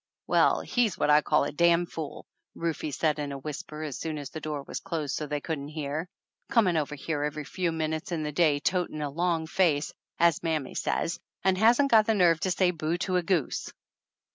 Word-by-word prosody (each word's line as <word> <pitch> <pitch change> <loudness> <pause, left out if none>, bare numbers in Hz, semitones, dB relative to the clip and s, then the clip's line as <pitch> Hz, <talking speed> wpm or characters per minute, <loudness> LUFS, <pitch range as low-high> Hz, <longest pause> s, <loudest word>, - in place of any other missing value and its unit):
"Well, - - +3
he's 235 -6 0
what - - +2
I 150 +1 +6
call 150 0 +2
a - - -2
damn 170 +2 +3
fool," 160 -3 -7 0.3
Rufe 165 -2 -2
said 155 -2 +1
in 145 -1 -3
a 140 - -4
whisper 150 +2 -6
as 145 -4 -5
soon 160 -2 -3
as 145 -2 -7
the 160 - -6
door 150 -2 -4
was - - -5
closed 165 -4 -3
so 150 - -3
they 145 0 -2
couldn't 145 -3 -4
hear. 155 +2 -4 0.4
"Coming 205 -8 +3
over 150 -1 -1
here 145 +1 -3
every 150 +1 -2
few 175 +4 -2
minutes 160 +1 -3
in 160 -3 -1
the 150 - -2
day, 150 -2 +3
'totin' 175 -2 -1
a 145 - -3
long 170 +1 0
face,' 160 -4 +1 0.2
as 170 -2 +3
mammy 155 -5 -2
says, 170 - -1 0.2
and 190 -1 +3
hasn't 235 +8 +4
got 220 -1 +6
the 225 - +3
nerve 170 -4 +4
to 190 - -1
say 180 0 +2
boo 160 0 -2
to 185 +1 0
a - - +2
goose 170 -5 -1
160 Hz, 215 wpm, -28 LUFS, 150-175 Hz, 0.4 s, I